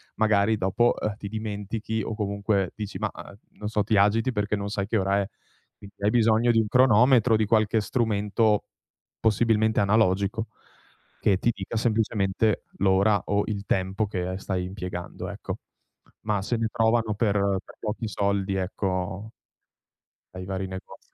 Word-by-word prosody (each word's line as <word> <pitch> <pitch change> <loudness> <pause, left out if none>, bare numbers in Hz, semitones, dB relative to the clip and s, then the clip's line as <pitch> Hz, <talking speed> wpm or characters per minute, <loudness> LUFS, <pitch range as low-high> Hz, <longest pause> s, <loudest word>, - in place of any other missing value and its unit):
magari, 110 0 +3
dopo, 105 +4 +2
uhm, 105 -1 -1
ti 105 - -7
dimentichi 110 +1 -4
o - - -4
comunque, 100 -2 -1
dici: 105 -3 -6
"Mah" 105 -1 -1
uhm, - - -10 0.2
non 105 - -5
so, 105 -1 +1
ti 105 0 +1
agiti 110 +5 +3
perché 105 -2 -1
non 100 0 -4
sai 100 -1 -2
che 110 - +1
ora 100 +1 +1
è. 100 - -3 0.5
Qui 100 - -12
hai 100 +1 +1
bisogno 115 0 +4
di 115 - +3
un 110 - +1
cronometro, 125 0 +5
di 110 0 +2
qualche 110 0 +2
strumento, 105 -1 +1 0.5
possibilmente 110 0 +2
analogico, 100 +1 +2 0.7
che 100 -3 +3
ti 120 - +2
dica 100 +3 -6
semplicemente 110 -2 +1
l'ora 100 +2 +3
o 100 0 +1
il 100 -2 -4
tempo 95 +3 0
che, 100 -3 -3
uhm, 90 +1 -3
stai 95 -1 -3
impiegando, 90 -2 -6
ecco. - - -5 0.7
Mah, 105 -2 +1
se 120 +4 -1
ne 115 0 0
trovano 110 -1 +1
per 110 -1 +1 0.3
per - - -15
pochi 110 +1 -3
soldi, 100 -1 -1
ecco 95 +2 -3 1.0
ai 90 0 -6
vari 95 0 -3
negozi 95 0 -10
105 Hz, 160 wpm, -26 LUFS, 100-110 Hz, 1.0 s, cronometro